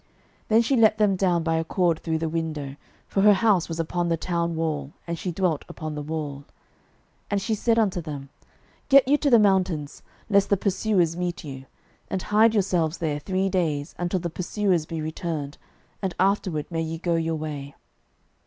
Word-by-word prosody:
06:002:015 - - -38 0.4
Then 220 +1 +5
she 270 +4 +1
let 220 -1 +5
them 210 -2 +3
down 180 -3 +1
by 165 0 +1
a 165 - 0
cord 170 -1 +1
through 160 -1 -1
the 160 0 -2
window: 155 -4 -3 0.3
for 195 - 0
her 205 0 +7
house 200 -5 +2
was 165 0 -4
upon 170 +1 -1
the 165 - +1
town 170 0 -1
wall, 155 -3 -2
and 170 - -3
she 180 +2 -4
dwelt 170 -4 0
upon 155 -1 -6
the 150 - -4
wall. 150 -2 -4
06:002:016 140 - -15 0.8
And 200 -1 0
she 220 - 0
said 230 +2 +1
unto 195 -6 +1
them, 145 -4 -7 0.6
Get 275 -2 +7
you 290 +2 +4
to 290 - +2
the 240 - +7
mountain, 190 -7 +2 0.4
lest 200 -2 +3
the 200 - +3
pursuers 190 -3 +1
meet 175 0 -3
you; 135 -3 -8 0.4
and 190 - -2
hide 220 +2 +4
yourselves 180 -5 +1
there 155 -4 -2
three 190 +4 -1
days, 160 -7 -1
until 175 +1 0
the 170 -1 -4
pursuers 180 -2 0
be 165 -1 -4
returned: 155 -2 -4 0.4
and 190 -4 -2
afterward 185 -5 +1
may 165 -1 -1
ye 165 0 -3
go 170 +1 -1
your 165 -1 0
way. 145 -3 -6
170 Hz, 195 wpm, -25 LUFS, 155-195 Hz, 0.8 s, her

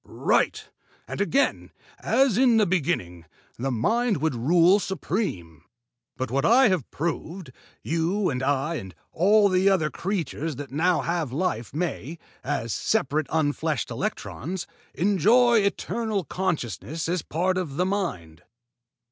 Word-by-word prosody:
"Right! - - 0 0.4
And - - -4
again, 270 +7 +1 0.3
as 265 -5 +2
in 245 -1 +4
the 215 - +4
beginning, 140 - -1 0.3
the 135 +3 -1
Mind 220 - +1
would 155 +1 0
rule 170 - +4
supreme. 170 - -3 0.5
By 130 - -1
what 135 +3 -1
I 250 +1 +5
have 180 -10 -1
proved, 165 0 -4 0.3
you 170 +5 0
and 125 -1 -3
I 145 +4 0
and 95 - -9 0.2
all 200 +2 +4 0.2
other 160 -6 +1
creatures 165 -5 -3
that 140 +1 -8
now 170 +5 +2
have 170 -6 -2
life 135 -6 -2
may, 160 -1 -4 0.3
as 125 -5 -2
separate 155 -7 0
unfleshed 155 -3 -1
electrons, 175 +7 -4 0.3
enjoy 220 +6 +4
eternal 210 0 -1
consciousness 155 - -3
as 175 0 0
a - - -24
part 185 +3 0
of 155 -7 -5
the 180 - +2
Mind." 90 - -3
170 Hz, 130 wpm, -25 LUFS, 140-195 Hz, 0.5 s, I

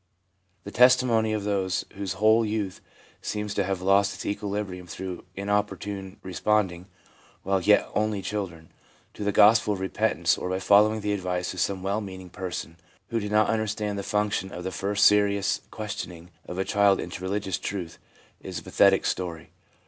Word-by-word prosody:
The 100 - -8
testimony 125 -2 +4
of 105 -2 -1
those 95 -3 -1
whose 100 -1 -4
whole 110 +2 +4
youth 105 -3 -3 0.4
seems 105 -1 -3
to 100 - +1
have 95 -1 -3
lost 100 +1 +3
its - - -8
equilibrium 100 -3 -3
through 90 +1 -6
inopportune 100 -1 -2
respond 100 +1 +1
ing, 85 +2 -11 0.6
while 95 0 +1
yet 105 +3 +4
only 105 -2 0
children, 95 -5 -5 0.4
to - - -6
the 105 - +1
gospel 105 +1 +5
of - - -8
repentance, 95 -3 +1
or 90 - -3
by 95 - 0
following 105 +3 +4
the 105 0 -1
advice 90 -2 -2
of - - -7
some 95 -2 -1
well 100 +3 -1
meaning 95 -3 -9
person 90 -2 -6 0.3
who 115 - 0
did 105 -1 -4
not 105 0 +4
understand 105 -2 -2
the - - -1
function 105 -1 -1
of 90 - -7
the 95 - -3
first 100 +2 +1
serious 100 -1 +3
questioning 90 -5 -6 0.2
of 90 - -6
a 95 - 0
child 100 -1 +3
into 90 +1 -6
religious 95 0 -2
truth, 90 -5 -5 0.4
is 95 -2 -7
a - - -6
pathetic 95 +1 +4
story. 85 -4 -3
100 Hz, 170 wpm, -26 LUFS, 95-105 Hz, 0.6 s, gospel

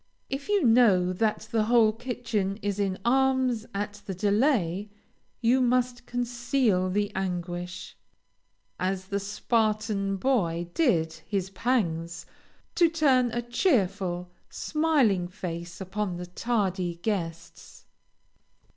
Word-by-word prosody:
If 275 +7 -4
you 410 -4 +3
know 220 -7 +5
that 215 +2 -1
the 220 -2 +2
whole 225 -2 +4
kitchen 225 -4 -2
is 205 0 -1
in 195 -2 0
arms 260 -2 +2
at 205 0 -4
the 190 - -3
delay, 205 - +1 0.5
you 250 +2 +3
must 250 0 +1
conceal 240 -5 0
the 205 +2 0
anguish, 180 -1 -4 0.8
as 185 0 -1
the 200 +1 -2
Spartan 210 -1 0
boy 175 -8 0
did 170 - +2
his 195 -2 -2
pangs, 175 -7 -1 0.5
to 340 -2 +4
turn 275 -6 +3
a 240 +1 -3
cheerful, 195 - 0 0.2
smiling 280 - +1
face 175 -2 -6
upon 195 0 -3
the 180 - -5
tardy 185 -3 -1
guests. 170 -3 -5
205 Hz, 110 wpm, -27 LUFS, 185-245 Hz, 0.8 s, know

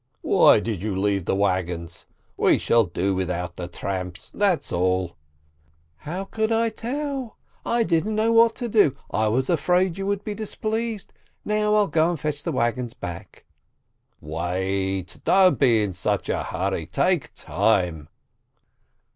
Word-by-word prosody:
"Why - - +6
did 105 -4 -3
you 105 -2 -2
leave 100 -1 0
the - - 0
wagons? 90 -4 -2 0.3
We - - +3
shall 115 -2 +3
do 95 +2 -1
without 90 -1 -3
the 90 - -5
tramps, 90 0 -5
that's 200 -5 +1
all 90 0 0 0.4
!" 80 +1 -39
"How 180 +5 -3
could 220 +2 -2
I 225 0 +2
tell? 265 +2 -4 0.3
I 235 0 +2
didn't 195 +3 0
know 220 +1 +2
what 230 0 +5
to 240 - -4
do. 205 - +3 0.2
I 110 +1 +1
was 130 +5 +1
afraid 180 +2 +1
you 195 - -3
would 200 0 -1
be 210 - -4
displeased. 220 +1 -3 0.3
Now 210 0 +1
I'll 210 -1 +3
go 160 +1 +2
and 175 -3 -3
fetch 150 -2 -2
the 165 - -3
wagons 120 -2 -1
back." 85 -1 -8 0.7
"Wait! 95 +4 -3
Don't 190 -1 +4
be 115 -6 +4
in 100 -2 -3
such 90 - -2
a - - 0
hurry, 90 -3 -3
take 170 - 0
time 90 -4 0
115 Hz, 155 wpm, -24 LUFS, -, 0.7 s, Why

